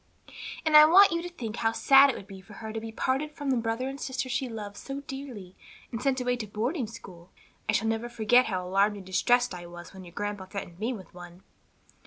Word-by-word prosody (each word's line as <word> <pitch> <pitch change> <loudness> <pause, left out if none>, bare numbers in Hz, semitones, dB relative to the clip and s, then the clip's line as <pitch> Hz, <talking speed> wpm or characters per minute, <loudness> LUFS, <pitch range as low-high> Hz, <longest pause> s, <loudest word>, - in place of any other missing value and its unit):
"And 310 -1 +3
I 300 0 +11
want 385 +6 +7
you 335 0 0
to 355 - -6
think 235 -10 -6
how 225 -1 +1
sad 275 +4 +6
it 265 - -1
would - - -9
be 195 -1 -11
for 210 +3 -15
her 220 0 -7
to 225 - -3
be 225 0 -7
parted 270 +6 -1
from 285 -3 -3
the - - +3
brother 230 +2 -2
and 275 +1 -6
sister 260 0 -3
she 250 +1 -1
loves 210 -3 -7
so 275 +1 -6
dearly 265 -10 -8 0.4
and 230 - -4
sent 270 0 +1
away 250 0 0
alone 245 - -1
to 215 - -4
boarding 235 - -2
school. 180 -5 -12 0.4
I - - +4
shall 220 - +1
never 225 +2 -1
forget 240 +2 +3
how 185 -3 -2
alarmed 200 +3 +2
and 195 - -10
distressed 240 +5 +2
I 175 -1 -8
was 175 +1 -11
when 190 -1 -10
your 170 -1 -13
grandpa 205 0 -4
threatened 185 -3 -7
me 225 +4 -1
with 205 -7 -9
one." 175 +1 -12
225 Hz, 245 wpm, -28 LUFS, 195-260 Hz, 0.4 s, I